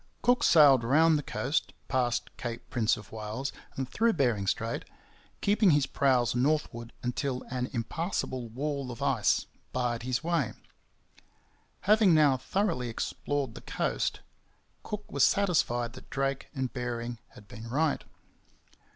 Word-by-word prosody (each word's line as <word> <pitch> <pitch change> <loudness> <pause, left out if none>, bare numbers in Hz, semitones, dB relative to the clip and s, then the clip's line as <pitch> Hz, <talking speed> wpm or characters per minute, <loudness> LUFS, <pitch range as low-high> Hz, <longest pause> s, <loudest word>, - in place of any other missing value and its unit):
Cook 245 +1 +4
sailed 140 -6 +7
round 155 +7 +5
the 150 - +1
coast, 140 +1 -2
past 125 -3 -1
Cape 120 -1 -6
Prince 120 -2 +2
of 105 -3 -12
Wales 110 +5 -4 0.2
and 135 -1 -3
through 225 - +2
Bering 120 - +1
Strait, 115 +4 -1 0.6
keeping 205 0 +4
his 145 -3 +4
prows 130 -4 +2
northward 125 -3 0
until 125 +1 -2
an 125 -1 -2
impassable 130 - -3
wall 140 +2 -3
of 125 +3 -6
ice 130 -7 +2 0.3
barred 120 -2 -1
his 125 +1 -2
way. 165 -7 0 1.3
Having 210 -3 +5
now 150 -3 +5
thoroughly 160 - -1
explored 135 +2 -3
the - - -10
coast, - - -2 0.6
Cook 210 0 -6
was - - +2
satisfied 120 - +2
that 130 - -13
Drake 135 0 -1
and 130 -2 -2
Bering 120 -2 -4 0.2
had 105 - -14
been 115 -2 -9
right. 150 +4 +1
130 Hz, 135 wpm, -29 LUFS, 120-150 Hz, 1.3 s, sailed